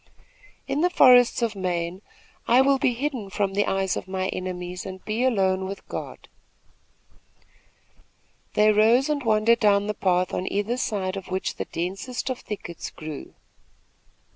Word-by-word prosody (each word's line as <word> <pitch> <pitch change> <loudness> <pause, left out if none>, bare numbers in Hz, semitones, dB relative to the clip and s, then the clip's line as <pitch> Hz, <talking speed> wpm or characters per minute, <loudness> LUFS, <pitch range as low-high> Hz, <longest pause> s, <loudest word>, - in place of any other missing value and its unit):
"In 280 +2 -1
the 355 - +3
forests 250 -7 +6
of 225 -2 -1
Maine, 180 -1 -3 0.5
I 240 +2 +5
will 270 0 +4
be 260 -4 +1
hidden 255 -6 -3
from 195 -1 -1
the 205 +1 +1
eyes 195 -1 0
of - - -5
my 190 0 -2
enemies 180 -1 -5
and 190 -1 -9
be 220 +3 -1
alone 190 -6 +1
with 195 +1 -8
God." - - -7 2.3
They 210 0 +5
rose 230 +6 +4
and 295 -1 0
wandered 225 +1 +3
down 205 -1 +3
the 210 - -2
path 185 -2 0
on 185 - -2
either 205 +5 -1
side 195 -6 -2
of 195 - -7
which 190 +1 -3
the - - -3
densest 195 +10 -4
of 255 - -4
thickets 175 -5 -7
grew. 155 -2 -9
205 Hz, 155 wpm, -25 LUFS, 185-240 Hz, 2.3 s, forests